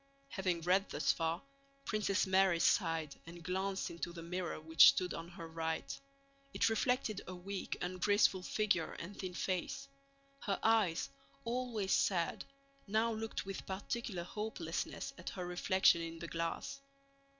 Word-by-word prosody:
Having 185 -7 -1
read 185 +4 +2
thus 150 - +2
far, 165 +2 -1 0.4
Princess 210 -3 +1
Mary 190 -2 +4
sighed 165 -5 +2
and 170 0 -10
glanced 190 +2 -1
into 170 0 -4
the 170 -1 -8
mirror 180 0 -3
which 160 +1 +8
stood 180 -1 +4
on 165 - -5
her 170 -1 -8
right. 160 0 -3 0.6
It - - +4
reflected 225 -2 +1
a 185 - -5
weak, 190 +2 -4
ungraceful 185 +2 +3
figure 195 -4 0
and 185 +4 -7
thin 185 -2 -5
face. 185 +11 -2 0.5
Her 200 -7 -1
eyes, 215 -7 +3 0.4
always 230 -5 -1
sad, 170 -4 +2 0.4
now 220 +3 +2
looked 220 -1 -4
with 195 0 -6
particular 195 -1 -3
hopelessness 210 +5 -4
at - - -5
her 180 -2 -5
reflection 180 0 +4
in 165 0 -5
the 170 - -6
glass. 165 +12 -3
185 Hz, 140 wpm, -36 LUFS, 170-205 Hz, 0.6 s, which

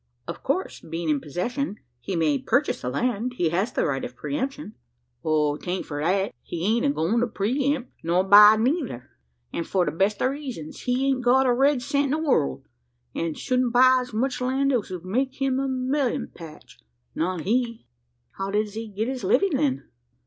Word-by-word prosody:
"Of - - -6
course, - - -2
being 165 0 -4
in 150 -2 +2
possession, 210 - -3 0.2
he 190 - -4
may 155 -4 +2
purchase - - 0
the 125 - -2
land? 245 - -1
He 175 -9 0
has 190 +8 0
the - - 0
right 135 -3 -1
of 125 - -6
pre 145 +2 -4
emption?" 270 -3 -4 0.5
"'Taint 155 +4 0
for 145 -1 -5
that. 190 +1 +1
He 170 +1 -5
ain't 235 +6 +2
a - - +3
goin' 220 - +1
to 240 - +1
pre 250 +6 0
empt, 255 -3 -9
nor 175 +3 +2
buy 210 +2 +9
neyther; 230 - -1 0.4
an' 170 - -2
for 180 +1 0
the - - -1
best 195 +5 0
o' 255 - +3
reezuns. 265 - -7
He 250 +1 +1
hain't 270 -2 +1
got 260 +2 +4
a 250 - +4
red 270 0 +2
cent 285 +2 +1
in - - -2
the 320 - -3
world, 145 - +1 0.5
an' 165 -2 -2
souldn't 255 -2 0
buy 255 +1 +6
as 250 0 -8
much 250 +4 -1
land 270 +2 +1
as 230 -5 0
would 180 -2 -7
make 260 +8 -1
him 270 -1 +1
a 275 - -1
mellyun 260 0 -1
patch 160 -3 -12 0.3
not 180 +1 -1
he." 230 +4 -1 0.5
"How 195 0 -2
does 210 0 -1
he 225 +1 -5
get 210 +2 -3
his 260 -1 -4
living, 395 -6 +2
then?" 270 -1 0
230 Hz, 200 wpm, -25 LUFS, 175-260 Hz, 0.5 s, buy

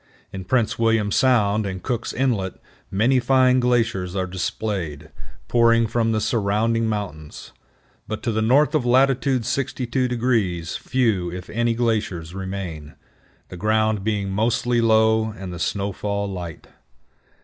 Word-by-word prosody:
In 95 -1 -6
Prince 115 +1 0
William 115 -2 +2
Sound 110 -5 +2
and 95 -1 -6
Cook's 120 -3 -2
Inlet 115 -8 -1 0.3
many 115 +7 +2
fine 130 0 +3
glaciers 115 -7 0
are 95 -1 0
displayed, 90 -4 -4 0.4
pouring 115 -1 +4
from 115 0 0
the 110 - +1
surrounding 110 +1 0
mountains; 90 -9 -5 0.6
but 110 - -5
to 120 - 0
the 110 0 0
north 135 +7 +3
of 155 -4 +2
latitude 130 0 +2
62° 120 -8 -1
few, 110 -9 0
if 90 0 -8
any, 120 +1 0
glaciers 105 -8 -1
remain, 95 -6 -6 0.5
the 90 - -9
ground 110 +1 +1
being 100 -2 -1
mostly 115 +3 +1
low 110 -1 +3
and 95 -2 -7
the 85 - -7
snowfall 100 +2 -2
light. 90 -4 -7
110 Hz, 130 wpm, -22 LUFS, 95-120 Hz, 0.6 s, pouring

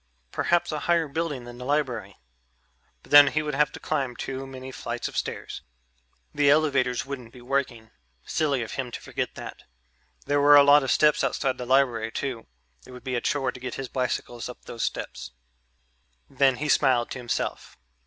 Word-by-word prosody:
Perhaps 175 -1 +1
a 155 - -2
higher 170 -1 +1
building 150 -3 -3
than 120 0 -10
the - - -7
library.... 125 -8 -2 0.9
But - - -19
then 145 0 +10
he 155 +3 0
would 150 -1 -3
have 150 +2 +2
to - - -8
climb 135 -5 -2
too 135 +2 -5
many 130 0 -8
flights 120 -2 -4
of - - -10
stairs. - - -4 0.7
The 145 -1 +3
elevators 140 -5 +2
wouldn't 130 -4 -7
be 125 - -14
working... 120 -4 -2 0.3
silly 140 -5 0
of 110 - -8
him 130 -2 -4
to - - -5
forget - - -4
that. - - -8 0.6
There 145 0 +1
were 145 +1 +7
a 145 - +9
lot 145 +1 +7
of 135 - -3
steps 150 -1 +4
outside 130 -2 -1
the 125 - -5
library 120 -4 +2
too 125 -3 -4 0.4
it - - -17
would 125 -1 -11
be 130 -1 -4
a 120 - 0
chore 140 -5 0
to 125 - -11
get 125 -1 -5
his 135 -2 -5
bicycles 125 -1 -3
up 125 - -11
those 115 - -7
steps. 65 -1 -4 0.9
Then 135 -1 +2
he 150 +4 -3
smiled 130 -5 +3
to 130 - -5
himself. 120 -2 -4
135 Hz, 190 wpm, -26 LUFS, 125-145 Hz, 0.9 s, then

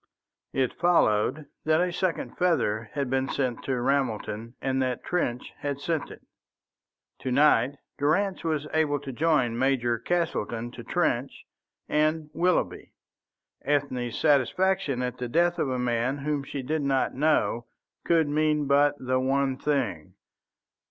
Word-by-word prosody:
It 130 -2 0
followed 145 -4 +2 0.2
that 155 0 +3
a 180 0 +1
second 185 -2 -2
feather 115 -12 +1
had 140 -2 -1
been 130 +1 0
sent 125 -4 -1
to 130 -2 -1
Ramelton, 120 -3 -1
and 130 0 0
that 130 -2 -1
Trench 125 -9 -2
had 140 -1 -3
sent 160 0 -2
it. - - -12 1.0
To 130 - -3
night 140 -1 +4 0.2
Durrance 185 +7 +1
was 155 -3 -1
able 150 -2 +2
to 140 -1 -7
join 130 -6 +1
Major 125 -3 +1
Castleton 120 -7 -2
to 120 -1 -9
Trench 130 -2 -1 0.4
and 155 0 +1
Willoughby. 180 +1 0 0.7
Ethne's 130 -5 -1
satisfaction 145 -1 +2
at 125 0 -4
the 125 -1 -3
death 175 +5 +2
of 140 - 0
a 130 - -1
man 125 +2 0
whom 145 0 -1
she 140 -1 -5
did 155 +4 -1
not 135 -2 +1
know 120 -6 +1 0.4
could 165 -3 +3
mean 150 0 +1
but 145 +1 +4
the 130 -1 0
one 135 +1 +1
thing. 130 - -2
140 Hz, 140 wpm, -27 LUFS, 125-155 Hz, 1.0 s, night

